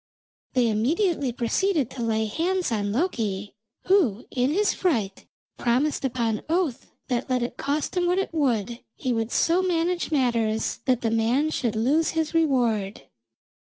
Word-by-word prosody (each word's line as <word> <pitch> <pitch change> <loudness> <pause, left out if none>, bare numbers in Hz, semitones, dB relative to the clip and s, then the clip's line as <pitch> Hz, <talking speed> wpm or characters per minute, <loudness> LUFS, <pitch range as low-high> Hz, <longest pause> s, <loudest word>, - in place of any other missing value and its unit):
They 250 -2 +3
immediately 280 - +1
proceeded 270 - 0
to 250 - -6
lay 220 -1 0
hands 345 - -1
on 205 -2 -1
Loki, 215 - -2 0.3
who, 305 - +2
in 250 +1 +1
his 405 +7 +2
fright, 225 - -1 0.3
promised 260 +6 +1
upon 235 -4 -1
oath 330 -7 -1 0.2
that 250 0 -2
let 250 -1 +1
it 240 - -4
cost 295 +5 -2
him 355 -1 +1
what 360 +1 +2
it 385 -3 -1
would, 240 -6 0 0.2
he 255 -2 -2
would 225 0 -2
so 340 +3 +3
manage 350 -1 0
matters 230 -6 0
that 255 -2 +2
the 225 - 0
man 240 +7 +1
should 235 -7 -1
lose 280 +9 +2
his 320 0 0
reward. 240 - +1
255 Hz, 150 wpm, -25 LUFS, 225-325 Hz, 0.3 s, They